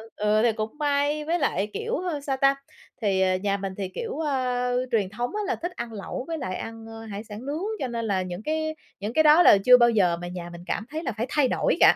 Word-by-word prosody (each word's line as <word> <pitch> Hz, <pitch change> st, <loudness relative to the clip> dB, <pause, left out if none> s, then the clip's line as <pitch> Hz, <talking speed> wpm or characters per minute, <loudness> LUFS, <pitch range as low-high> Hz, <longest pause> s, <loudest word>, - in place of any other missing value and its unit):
ừ, 210 Hz, +1 st, +2 dB
thì 235 Hz, -, +4 dB
cũng 220 Hz, +5 st, -4 dB
may. 290 Hz, 0 st, +1 dB
Với 340 Hz, +3 st, 0 dB
lại, 210 Hz, -7 st, 0 dB
kiểu, 460 Hz, +2 st, -2 dB
ơ, 355 Hz, -5 st, -2 dB
sao 275 Hz, -1 st, -2 dB
ta, 275 Hz, +1 st, +4 dB, 0.5 s
thì, 195 Hz, -3 st, +2 dB
ờ, 185 Hz, 0 st, +3 dB
nhà 200 Hz, +1 st, 0 dB
mình 195 Hz, -1 st, -4 dB
thì, 195 Hz, -2 st, -3 dB
kiểu, 460 Hz, -7 st, -4 dB
ơ, 250 Hz, -4 st, 0 dB
truyền 205 Hz, -5 st, +1 dB
thống 240 Hz, +4 st, -3 dB
á 425 Hz, -, -1 dB
là 385 Hz, -, 0 dB
thích 350 Hz, +2 st, -4 dB
ăn 235 Hz, -1 st, -5 dB
lẩu 210 Hz, +4 st, -5 dB
với 330 Hz, -1 st, -3 dB
lại 185 Hz, -9 st, -4 dB
ăn, 225 Hz, 0 st, -7 dB
ơ, 225 Hz, 0 st, -9 dB
hải 200 Hz, +1 st, -5 dB
sản 215 Hz, +2 st, -9 dB
nướng, 300 Hz, +5 st, -3 dB, 0.2 s
cho 260 Hz, -, -1 dB
nên 230 Hz, -1 st, -3 dB
là 195 Hz, -3 st, +1 dB
những 185 Hz, +3 st, -6 dB
cái 315 Hz, 0 st, -1 dB, 0.2 s
những 210 Hz, +3 st, -4 dB
cái 315 Hz, -, +4 dB
đó 310 Hz, +3 st, +7 dB
là -, -, +8 dB
chưa 250 Hz, 0 st, +9 dB
bao 240 Hz, -1 st, +5 dB
giờ 185 Hz, -7 st, +3 dB
mà 175 Hz, -, -5 dB
nhà 175 Hz, -1 st, -6 dB
mình 170 Hz, 0 st, -9 dB
cảm 215 Hz, -, -2 dB
thấy 315 Hz, +2 st, -4 dB
là -, -, -1 dB
phải 225 Hz, -, 0 dB
thay 290 Hz, 0 st, +3 dB
đổi -, -, +1 dB
cả, -, -, +7 dB
240 Hz, 265 wpm, -25 LUFS, 205-295 Hz, 0.5 s, chưa